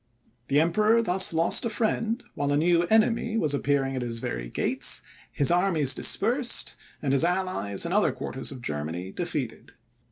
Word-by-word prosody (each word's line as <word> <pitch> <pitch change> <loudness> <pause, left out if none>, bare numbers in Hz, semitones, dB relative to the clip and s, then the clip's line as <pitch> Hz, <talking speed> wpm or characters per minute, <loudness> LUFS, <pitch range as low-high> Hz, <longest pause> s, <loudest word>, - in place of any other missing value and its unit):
The 140 +1 +2
Emperor 215 +8 +2
thus 190 -1 +3
lost 165 0 +2
a 235 - -1
friend, 225 +2 -2
while 145 -1 -2
a 145 - +2
new 170 +2 +2
enemy 225 +2 +1
was 155 -9 0
appearing 140 -1 -1
at 130 - -3
his 120 -1 -4
very - - -5
gates, - - 0 0.3
his 140 +3 +2
armies 175 -6 +1
dispersed, 240 +3 +2 0.3
and 135 -2 0
his 140 - +3
allies 175 - -1
in 170 - -3
other 210 +1 +2
quarters 130 - -5
of 130 -3 -10
Germany 80 +4 -5
defeated. 150 - -5
165 Hz, 165 wpm, -26 LUFS, 135-210 Hz, 0.3 s, thus